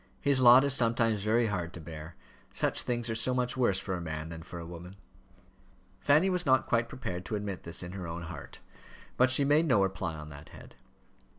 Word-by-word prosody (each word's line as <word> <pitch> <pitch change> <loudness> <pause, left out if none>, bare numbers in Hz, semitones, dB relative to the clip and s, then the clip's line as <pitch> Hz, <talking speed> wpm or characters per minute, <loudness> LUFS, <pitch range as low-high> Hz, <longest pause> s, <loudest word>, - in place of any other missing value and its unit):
His 140 -2 +3
lot 125 +2 +8
is 140 -1 +2
sometimes 115 -3 +2
very 110 +3 +2
hard 90 -5 -3
to - - -8
bear: 80 +1 -9 0.4
such - - 0
things 120 -1 -2
are 115 - -2
so 115 +3 0
much 125 -1 -1
worse 120 -7 +2
for 95 - -4
a 90 - -3
man 80 -1 -5
than 80 -1 -7
for 85 - -10
a 85 - -7
woman." 90 +2 -10 1.0
Fanny 150 +6 +3
was 180 -2 +1
not 130 -3 +3
quite 115 0 0
prepared 90 -8 -5
to 110 - -3
admit 100 -3 -4
this 85 +1 -3
in 90 - -7
her 95 -2 -6
own 85 +1 -6
heart, 85 -4 -10 0.5
but 130 +1 +4
she 130 +2 +3
made 150 +4 +3
no 110 -8 +4
reply 95 -4 -3
on 75 -1 -9
that 75 0 -12
head. - - -14
105 Hz, 215 wpm, -30 LUFS, 85-125 Hz, 1.0 s, lot